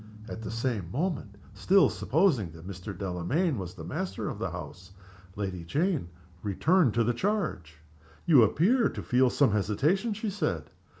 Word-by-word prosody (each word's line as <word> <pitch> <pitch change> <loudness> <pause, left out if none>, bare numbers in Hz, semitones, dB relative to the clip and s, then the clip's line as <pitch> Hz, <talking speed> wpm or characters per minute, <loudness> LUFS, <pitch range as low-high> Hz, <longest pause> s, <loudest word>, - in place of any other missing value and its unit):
At 110 - -7
the 110 - -5
same 115 -6 -2
moment 140 - -2 0.2
(still 185 - +4
supposing 120 - +1
that 80 +2 -11
Mr. 95 0 -7
Delamayn 100 - -1
was 90 -1 -6
the 85 - -9
master 95 +3 -4
of - - -6
the - - -2
house) 95 +1 -9 0.4
Lady 95 -4 -4
Jane 150 - 0 0.3
returned 135 - +2
to 115 - +3
the 120 +2 +1
charge. 155 - -2 0.5
"You 150 -7 +7
appear 195 - +3
to - - -7
feel 125 0 +3
some 135 -2 +3
hesitation," 150 - +1
she 215 0 -3
said. 200 - -2
115 Hz, 160 wpm, -28 LUFS, -, 0.5 s, You